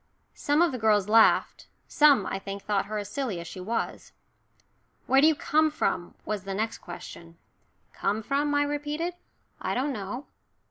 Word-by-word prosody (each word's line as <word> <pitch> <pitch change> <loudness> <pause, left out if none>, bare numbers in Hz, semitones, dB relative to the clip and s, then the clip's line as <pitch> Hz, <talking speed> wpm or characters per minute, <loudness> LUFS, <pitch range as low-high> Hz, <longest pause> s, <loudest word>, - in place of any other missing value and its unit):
Some 295 +3 +2
of 345 - +2
the 255 - -5
girls 210 -3 +3
laughed, 225 +1 +4 0.2
some, 295 -3 +5
I 195 - -3
think, 195 0 -7
thought 200 -1 0
her 215 +1 -3
as 205 -1 -4
silly 230 -5 -3
as 170 - -7
she 185 - -8
was. 225 +5 -4 0.9
"Where 270 +1 +4
do 305 - +6
you 320 - +4
come 310 +2 +2
from?" 175 -11 -2
was 210 -3 -3
the 195 -1 -4
next 220 +2 -2
question. 170 -1 -10 0.6
"Come 215 +2 -1
from?" 290 +4 0
I 290 - +3
repeated. 295 +4 -2 0.5
"I - - -2
don't 270 +3 0
know." 215 +6 -5
225 Hz, 175 wpm, -27 LUFS, 200-290 Hz, 0.9 s, do